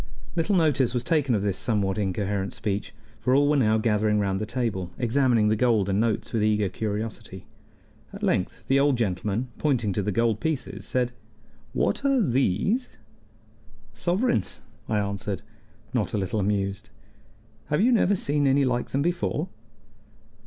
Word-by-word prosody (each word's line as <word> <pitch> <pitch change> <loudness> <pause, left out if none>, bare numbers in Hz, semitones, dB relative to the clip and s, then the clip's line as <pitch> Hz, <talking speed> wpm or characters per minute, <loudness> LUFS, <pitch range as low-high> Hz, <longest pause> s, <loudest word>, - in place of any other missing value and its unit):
Little 175 +4 +1
notice 140 -7 +2
was 120 - 0
taken 145 -7 +2
of 100 - -1
this 100 -3 0
somewhat 105 -3 0
incoherent 100 0 -1
speech, 100 -1 -3 0.3
for 130 - +2
all 145 +1 +4
were 150 - +3
now 110 -5 +3
gathering 105 -1 +2
round 100 -1 0
the 110 - -3
table, 110 -7 -2
examining 120 -2 +2
the 110 - +3
gold 110 -4 +2
and 95 +1 +1
notes 115 +1 -1
with 115 - +1
eager 105 -2 +2
curiosity. 105 +2 -5 0.7
At - - -9
length - - -1
the 135 +1 +4
old 140 -2 +3
gentleman, 105 +3 -1
pointing 120 -9 +1
to 105 - 0
the 105 - -1
gold 115 0 +1
pieces, 155 -6 -3
said: 125 -1 0 0.6
"What - - 0
are 275 -1 +3
these?" 135 - +1 1.0
"Sovereigns," 180 - 0 0.3
I 110 - +1
answered, 100 -1 -2 0.5
not - - 0
a - - +1
little 100 +2 -1
amused. 100 0 -1 0.8
"Have 150 - +1
you 245 +4 +4
never 205 -4 +3
seen 145 -5 +1
any 135 +1 +4
like 120 -1 -1
them 140 +1 0
before?" 175 0 -1
115 Hz, 160 wpm, -26 LUFS, 105-140 Hz, 1.0 s, all